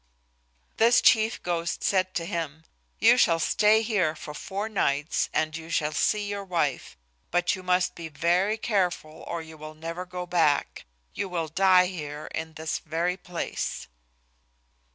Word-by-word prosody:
This 230 +1 +5
chief 225 -2 +3
ghost 170 -1 -2
said 185 -1 +1
to 165 - -1
him, 160 -4 -4 0.3
"You 235 +3 +6
shall 170 -8 +4
stay 210 +6 +3
here 200 -9 +1
for 155 -3 -8
four 200 +7 -4
nights 150 -8 0
and 155 -1 0
you 165 0 -8
shall 155 -2 0
see 210 +6 +1
your 200 0 -4
wife, 165 - -2 0.3
but 175 0 +1
you 190 - -9
must 180 0 +1
be 170 -1 -7
very 175 +8 +1
careful 180 -8 -1
or 170 -1 -4
you 160 0 -12
will 155 0 -9
never 165 +3 -6
go 180 0 -5
back. 165 -5 +1 0.3
You 195 - -3
will 170 -3 -2
die 185 +2 +5
here 150 -5 -6
in 160 0 -4
this 160 0 -3
very 170 +3 -1
place." 180 - -4
175 Hz, 155 wpm, -26 LUFS, 160-195 Hz, 0.3 s, You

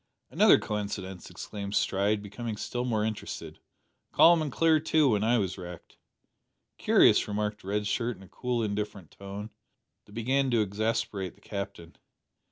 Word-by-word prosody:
"Another - - +6
coincidence!" 100 -3 -5
exclaimed 100 -1 -6
Stride, 100 +2 +1
becoming 110 +2 -5
still 120 +3 -3
more 110 -4 0
interested. 110 -1 -5 0.5
"Calm 170 -1 +6
and 150 -3 -2
clear, 160 +3 +3
too, 155 -2 +3
when 105 -3 +2
I 120 +2 +3
was 95 -3 -2
wrecked!" 90 -2 -10 0.8
"Curious," - - +5
remarked 105 0 -3
Red 105 +2 -1
Shirt 115 +2 -1
in 95 - -14
a - - -14
cool 125 +4 -2
indifferent 105 -4 -4
tone, 100 +2 -8 0.5
that 105 - -17
began 130 +4 +1
to 120 -3 +3
exasperate 105 -2 -2
the - - -25
Captain. 100 -4 -7
105 Hz, 150 wpm, -28 LUFS, 100-120 Hz, 0.8 s, Another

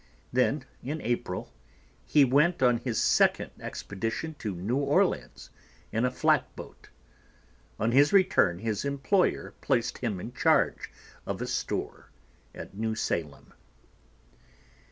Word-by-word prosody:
Then, 130 +2 +1 0.2
in 150 +5 -4
April, 120 -6 -3 0.5
he 145 -2 +5
went 145 +5 +3
on 125 -1 +4
his 120 -2 -2
second - - +3
expedition 115 +11 -4
to 105 -4 -4
New 100 +9 -1
Orleans 140 - 0 0.4
in 115 +3 +1
a - - +2
flatboat. 125 - -1 0.9
On 110 +3 +1
his 140 +4 +5
return 180 - +4
his 110 +1 -2
employer 140 +7 0
placed 120 -4 0
him 110 -7 -2
in 120 +7 -7
charge - - +2 0.4
of - - -3
a - - -2
store - - -4 0.5
at - - -9
New 110 +1 -2
Salem. 80 -9 -3
120 Hz, 120 wpm, -28 LUFS, 110-140 Hz, 0.9 s, he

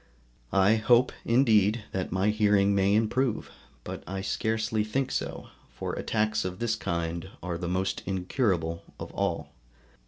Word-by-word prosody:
I 100 +3 +5
hope 120 +3 +4
indeed 115 -3 +4
that 95 -1 -3
my 95 +3 +2
hearing 105 -2 +3
may 100 +1 +3
improve, 115 +2 0 0.3
but - - -6
I 95 +1 -3
scarcely 110 +1 0
think 130 +5 -1
so, - - -3 0.3
for - - -4
attacks 110 -1 0
of 90 0 -4
this 115 0 0
kind 85 +1 -3
are 90 -1 -2
the 90 - -3
most 95 +2 -1
incurable 90 - 0 0.2
of - - -6
all. - - -2
105 Hz, 145 wpm, -28 LUFS, 95-110 Hz, 0.3 s, I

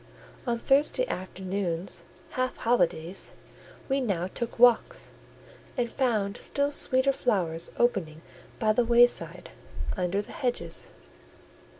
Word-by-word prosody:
On 235 -1 +1
Thursday 290 - +3
afternoons 185 -1 -3 0.3
(half 255 0 -1
holidays) 180 -6 0 0.5
we 270 0 +1
now 195 -8 0
took 230 +5 -4
walks, 240 -1 +4 0.7
and 240 -2 0
found 215 -7 0
still 280 0 0
sweeter 275 -1 +2
flowers 175 -10 0
opening 170 -10 0 0.3
by 215 -1 +2
the 245 - +3
wayside, 240 +1 +3 0.4
under 185 +1 0
the - - -13
hedges. 245 -1 -3
230 Hz, 105 wpm, -28 LUFS, 185-245 Hz, 0.7 s, walks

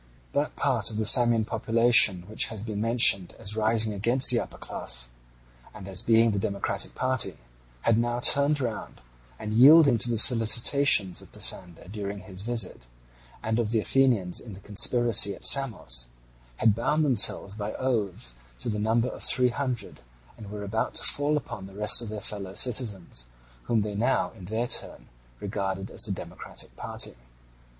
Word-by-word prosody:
That 145 +1 -2
part 125 -8 0
of 110 - -6
the 110 - -1
Samian 120 -1 +5
population 115 -4 +2
which 110 - -1
has 110 -2 -9
been 105 -2 -5
mentioned 115 -5 +2
as 105 -2 -4
rising 110 0 0
against 120 +7 +3
the 120 - +1
upper - - -8
class, - - -3 0.6
and 100 -3 -11
as 95 -2 +1
being 115 0 +3
the 100 - -2
democratic 100 -1 -3
party, 130 - -1 0.4
had 115 - +1
now 120 +1 -2
turned 140 +3 +3
round, 120 -5 -6 0.4
and 105 +8 -6
yielding 140 +1 +6
to 120 - 0
the 115 - -1
solicitations 115 -2 +4
of - - -17
Pisander 85 -1 -1
during 100 0 -7
his 95 0 -9
visit, 115 - -2 0.6
and 110 +1 -2
of 115 -3 -1
the 115 0 +1
Athenians 110 -7 +1
in 110 - -11
the 95 - -12
conspiracy 105 0 +2
at - - -14
Samos, 95 - +2 0.5
had 110 -2 +2
bound 150 +8 -1
themselves 110 -6 +2
by 105 0 -6
oaths 105 - -3 0.3
to - - -4
the 105 -1 -3
number 115 +3 0
of - - -10
three 125 -1 +1
hundred, 125 - -5 0.4
and 105 -3 -12
were 105 0 -8
about 100 - -4
to - - -4
fall 145 +1 +3
upon 105 -8 -8
the 95 - -16
rest 105 +3 +4
of 115 - -8
their 105 -1 -7
fellow 100 -3 -5
citizens, 105 - -1 0.4
whom 115 -2 0
they 105 0 -5
now 110 -3 -1
in 90 - -14
their 110 +5 -3
turn - - -1 0.3
regarded 95 0 -5
as - - +2
the 105 - +5
democratic 90 -2 -7
party. - - -2
110 Hz, 170 wpm, -25 LUFS, 100-120 Hz, 0.6 s, yielding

